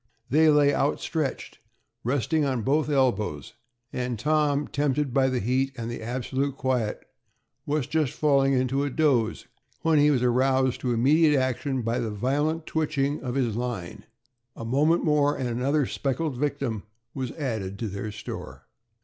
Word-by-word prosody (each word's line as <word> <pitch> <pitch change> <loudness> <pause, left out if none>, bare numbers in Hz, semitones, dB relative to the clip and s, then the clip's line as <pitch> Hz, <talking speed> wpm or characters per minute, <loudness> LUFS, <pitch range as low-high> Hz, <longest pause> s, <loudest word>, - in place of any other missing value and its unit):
They 155 +3 +5
lay 145 -1 +5
outstretched, 145 0 -2 0.4
resting 145 +5 +1
on 130 -5 -1
both 150 +4 +1
elbows, 120 - 0 0.4
and 125 -2 -2
Tom, 150 +2 +1
tempted 145 -2 0
by 135 -1 +3
the 130 -1 0
heat 130 +4 0
and 115 0 -4
the 120 - -6
absolute 130 +4 -2
quiet, 125 -5 -1 0.6
was 150 -2 0
just 155 -3 0
falling 140 -2 +3
into 130 +2 +1
a 145 - -1
doze, 130 -7 +1 0.4
when 160 -2 +4
he 145 +1 +5
was 130 -4 +2
aroused 130 +1 +2
to 125 - -1
immediate 145 +6 +4
action 130 0 -1
by 115 +1 0
the 115 - -2
violent 145 +9 -1
twitching 150 -3 -1
of 125 -1 -4
his 120 -6 0
line. 120 -8 -4 0.5
A 115 - -7
moment 150 +8 +2
more, 150 -1 +2
and 130 - -2
another 130 +5 +1
speckled 140 +3 -2
victim 135 -5 -2 0.3
was 130 -3 -4
added 110 - -3
to 115 - -3
their 100 +2 -5
store. 65 -10 -8
135 Hz, 155 wpm, -26 LUFS, 120-145 Hz, 0.6 s, They